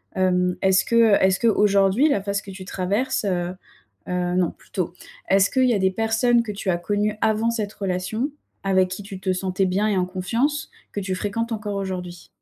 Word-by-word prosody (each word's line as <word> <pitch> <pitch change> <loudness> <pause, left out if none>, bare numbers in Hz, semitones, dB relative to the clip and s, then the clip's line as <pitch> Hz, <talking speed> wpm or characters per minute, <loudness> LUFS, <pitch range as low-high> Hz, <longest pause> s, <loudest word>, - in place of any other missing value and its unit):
Hem, 180 -1 +2
est-ce 190 0 +4
que 230 -2 +4
est-ce 190 0 +3
qu'aujourd'hui 210 +3 +3
la 200 -9 +1
phase 200 -1 -1
que 200 - -12
tu 185 0 -9
traverses, 205 +7 -1
heu 180 -2 -1 0.6
heu 180 0 -1
non, 180 -3 +2
plutôt, 180 -3 -5 0.4
est-ce 195 +1 +5
qu'il 260 -1 +2
y - - +4
a - - +1
des 190 -1 +2
personnes 225 +3 +2
que 215 - -5
tu 200 -1 -6
as 175 - +3
connu 205 +3 0
avant 220 +1 +2
cette 215 -3 -3
relation 195 +8 -2 0.3
avec 190 -1 +2
qui 185 +2 -5
tu 195 -1 -8
te 190 -1 0
sentais 185 +1 -1
bien 195 +3 +1
et 205 - +1
en 180 - +2
confiance, 230 +12 -1 0.2
que 205 - -3
tu 190 -1 -2
fréquentes 215 +5 -2
encore 210 -2 -3
aujourd'hui? 180 -3 -5
195 Hz, 200 wpm, -23 LUFS, 185-220 Hz, 0.6 s, est-ce